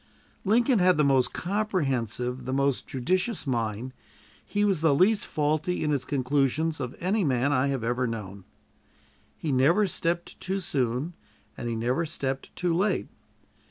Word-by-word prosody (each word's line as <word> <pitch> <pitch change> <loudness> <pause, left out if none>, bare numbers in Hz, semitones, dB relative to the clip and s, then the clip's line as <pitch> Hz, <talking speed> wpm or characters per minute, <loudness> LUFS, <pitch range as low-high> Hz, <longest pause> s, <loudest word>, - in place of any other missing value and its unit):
Lincoln 235 +3 +3
had 180 -2 +4
the 150 - +4
most 135 -3 +3
comprehensive, 135 - -1
the 130 - -2
most 140 -1 0
judicious 185 - -1
mind; 120 -1 -2 0.5
he 205 0 0
was 195 -6 +1
the 160 -3 +4
least 200 +7 +3
faulty 155 +4 0
in 150 - +1
his 140 -3 0
conclusions 145 +4 0
of 125 -2 -4
any 195 +4 +1
man 135 -1 +2
I 130 0 +2
have 135 -4 -1
ever 125 +2 0
known. 100 -4 -6 0.9
He 155 - -2
never 145 +11 +4
stepped 170 -2 -2
too 190 +1 -2
soon, 135 -1 -1 0.4
and 120 - -4
he 115 - -2
never 125 +9 0
stepped 135 -2 -4
too 175 -2 0
late. 195 +5 0
140 Hz, 155 wpm, -27 LUFS, 125-180 Hz, 0.9 s, had